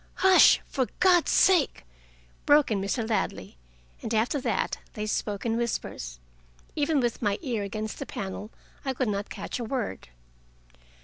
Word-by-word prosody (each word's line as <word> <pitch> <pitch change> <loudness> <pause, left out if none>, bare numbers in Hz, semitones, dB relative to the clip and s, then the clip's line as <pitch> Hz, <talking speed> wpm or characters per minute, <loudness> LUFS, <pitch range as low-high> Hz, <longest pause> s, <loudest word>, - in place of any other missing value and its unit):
"Hush, 380 -1 +6
for 260 -3 -1
God's 360 -2 +4
sake!" 355 - +3 0.6
broke 290 -3 +5
in 200 -2 0
Mr. 220 +3 -2
Ladley, 220 - -2 0.5
and 225 - -5
after 240 +6 +1
that - - -1
they 210 -1 -4
spoke 210 -1 -2
in 230 -1 0
whispers. 60 - -4 0.6
Even 295 0 +1
with 240 -2 -1
my 205 -3 +1
ear 240 -7 -2
against 215 +2 -5
the - - -5
panel, 200 +2 -6 0.3
I 270 -2 -1
could 255 -3 0
not 200 0 -3
catch - - -5
a - - -3
word. 235 - -4
230 Hz, 150 wpm, -27 LUFS, 210-275 Hz, 0.6 s, Hush